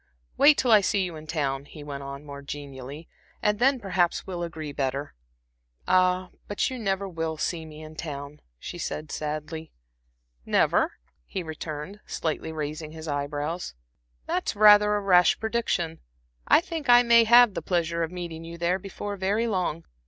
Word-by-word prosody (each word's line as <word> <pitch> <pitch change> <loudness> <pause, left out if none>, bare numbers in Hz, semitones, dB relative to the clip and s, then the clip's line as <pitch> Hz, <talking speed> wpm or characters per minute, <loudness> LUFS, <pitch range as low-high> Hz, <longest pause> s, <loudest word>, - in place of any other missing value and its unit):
Wait 290 +1 +6
till 250 - +2
I 215 -2 +8
see 195 0 +1
you 175 -3 -4
in 155 0 -10
town," 140 -3 -1
he 150 +1 -11
went 140 -1 -6
on, 140 +1 -8
more 140 -1 -8
genially 140 +1 -8 0.3
"and 210 0 +1
then 265 +1 +4
perhaps 180 -5 0
we'll 180 -2 -5
agree 160 -3 -5
better." 140 +1 -2 0.7
"Ah, 185 0 +3 0.2
but 205 +5 -1
you 255 - -5
never 195 -2 -1
will 165 -3 -3
see 160 0 -2
me 155 0 -10
in 155 0 -11
town," 145 -2 -7 0.2
she 175 - -7
said, 155 -2 -4
sadly. 155 +1 -4 0.7
"Never?" - - +2 0.3
he 185 - -5
returned, 160 +4 -6
slightly 160 0 -3
raising 155 0 -5
his 160 0 -8
eye 145 -1 -1
brows. 150 - -4 0.5
"That's 185 - -1
rather 210 0 +7
a 205 - 0
rash 180 -3 +5
prediction. 220 -8 -1 0.5
I - - +6
think 330 -6 -5
I 245 0 +8
may 235 -1 +6
have 240 -1 +7
the - - -3
pleasure 170 -2 0
of 165 - 0
meeting 170 -2 -6
you 170 +1 -8
there 175 +2 +1
before 200 +1 -6
very 200 +5 +1
long. 185 - -1
170 Hz, 170 wpm, -26 LUFS, 150-200 Hz, 0.7 s, I